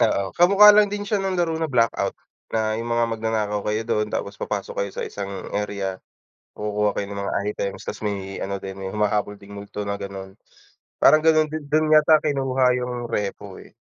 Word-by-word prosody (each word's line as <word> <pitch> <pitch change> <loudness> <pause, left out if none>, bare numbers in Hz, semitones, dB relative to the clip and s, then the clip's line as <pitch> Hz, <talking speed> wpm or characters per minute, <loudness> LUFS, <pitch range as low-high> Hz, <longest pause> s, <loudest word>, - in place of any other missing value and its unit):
Oo. 100 -1 +1
Kamukha 200 +4 +7
lang 210 -1 +5
din 205 0 -4
siya 205 -1 0
ng 190 -1 -1
laro 170 -2 +1
na 160 - 0
Blackout, 115 -6 +1 0.3
na 110 -1 0
yung 120 - -5
mga 120 0 +2
magnanakaw 110 -2 -1
kayo 105 +1 0
do'n, 105 -2 0
tapos 100 - -5
papasok 105 -2 -3
kayo 100 -1 -2
sa - - -4
isang 100 -1 -6 0.2
area, 100 -2 -3 0.6
kukuha 105 0 0
kayo 100 - -2
ng 100 - -4
mga 100 - -3
items, 100 -2 -4
ta's - - -6
may 100 -2 -4
ano 100 0 -3
din, 95 0 -7
may 95 - -4
humahabol 105 -1 -1
ding 100 +1 -13
multo 100 0 -6
na 100 - -1
gano'n. 95 -1 -7 0.7
Parang 155 +2 +6
gano'n 155 -1 +4
din 155 0 -5
do'n 155 0 +3
yata 155 0 +6
kinuha 135 -3 0
yung 125 -1 -3
REPO, 100 -2 -3 0.2
eh, - - -19
105 Hz, 195 wpm, -23 LUFS, 100-150 Hz, 0.7 s, Kamukha